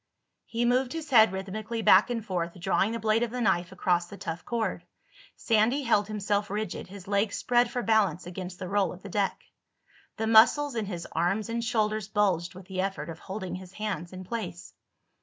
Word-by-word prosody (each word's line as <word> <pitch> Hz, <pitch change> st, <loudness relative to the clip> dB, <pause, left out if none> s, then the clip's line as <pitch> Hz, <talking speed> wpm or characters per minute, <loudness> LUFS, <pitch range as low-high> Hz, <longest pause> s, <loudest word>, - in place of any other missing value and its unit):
He 235 Hz, +1 st, -1 dB
moved 250 Hz, +1 st, +2 dB
his 320 Hz, -3 st, -6 dB
head 220 Hz, -5 st, +7 dB
rhythmically 215 Hz, +4 st, -4 dB
back 190 Hz, +5 st, +6 dB
and 230 Hz, -3 st, -3 dB
forth, 175 Hz, -3 st, -3 dB
drawing 190 Hz, +3 st, +1 dB
the 230 Hz, -, -2 dB
blade 220 Hz, +1 st, +2 dB
of 240 Hz, -, 0 dB
the 250 Hz, +2 st, -4 dB
knife 175 Hz, -6 st, +1 dB
across 175 Hz, -2 st, +1 dB
the 200 Hz, -, -10 dB
tough 165 Hz, -2 st, -5 dB
cord. 235 Hz, -2 st, -2 dB, 0.5 s
Sandy 230 Hz, +5 st, +2 dB
held 210 Hz, -5 st, +2 dB
himself 205 Hz, -1 st, -1 dB
rigid, 210 Hz, 0 st, -4 dB
his 190 Hz, 0 st, -11 dB
legs 200 Hz, +1 st, +1 dB
spread 245 Hz, 0 st, +2 dB
for 245 Hz, 0 st, -3 dB
balance 215 Hz, -5 st, +2 dB
against 180 Hz, 0 st, -7 dB
the 185 Hz, -, -6 dB
roll 195 Hz, +1 st, +1 dB
of 185 Hz, -, -13 dB
the 200 Hz, -, -8 dB
deck. 200 Hz, 0 st, -1 dB, 0.7 s
The 220 Hz, -, -1 dB
muscles 240 Hz, +6 st, +5 dB
in 225 Hz, -3 st, -2 dB
his 175 Hz, -4 st, -5 dB
arms 195 Hz, +7 st, 0 dB
and 230 Hz, 0 st, -2 dB
shoulders 215 Hz, -3 st, 0 dB
bulged 190 Hz, -5 st, 0 dB
with 185 Hz, 0 st, -11 dB
the 185 Hz, 0 st, -3 dB
effort 190 Hz, -5 st, -3 dB
of 160 Hz, -, -10 dB
holding 190 Hz, -1 st, -6 dB
his 185 Hz, 0 st, -8 dB
hands 205 Hz, -5 st, -4 dB
in 185 Hz, 0 st, -8 dB
place. 185 Hz, -4 st, -6 dB
205 Hz, 195 wpm, -28 LUFS, 185-225 Hz, 0.7 s, head